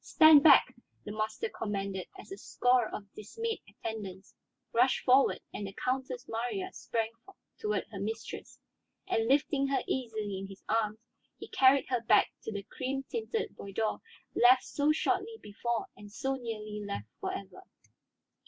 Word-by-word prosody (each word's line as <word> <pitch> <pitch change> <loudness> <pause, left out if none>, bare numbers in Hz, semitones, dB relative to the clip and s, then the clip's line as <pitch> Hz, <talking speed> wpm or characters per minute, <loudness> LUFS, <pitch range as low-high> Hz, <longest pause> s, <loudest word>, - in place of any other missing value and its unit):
"Stand 315 -3 +8
back!" 285 -4 +7 0.3
the 210 - -5
master 215 - -2
commanded 200 - -3
as 380 - -12
a 390 - -6
score 245 - +2
of 200 -1 -8
dismayed 455 - -4
attendants 195 -4 -7 0.4
rushed 250 +3 +3
forward 260 +2 +5
and 205 - -4
the 195 - -8
Countess 255 -1 -2
Marya 245 - -3
sprang 225 -1 -2 0.5
toward 425 -1 -1
her 200 - -6
mistress. 220 +3 -5 0.5
And 225 0 +1
lifting 275 +1 +2
her 275 0 0
easily 220 -6 -2
in 195 - -6
his 195 -1 -13
arms, 215 -1 +1 0.4
he - - -9
carried 265 +1 +5
her 250 -2 +1
back 215 -2 +4
to - - -3
the 200 -1 -4
cream 265 +5 -4
tinted 450 -1 -2
boudoir 210 +2 -2 0.3
left 250 +1 +6
so 290 +1 +1
shortly 385 +7 0
before 235 - -3
and 205 0 -12
so 265 +5 -2
nearly 215 -4 -5
left 200 - -4
for - - -2
ever. 200 - -7
235 Hz, 155 wpm, -31 LUFS, 210-275 Hz, 0.5 s, Stand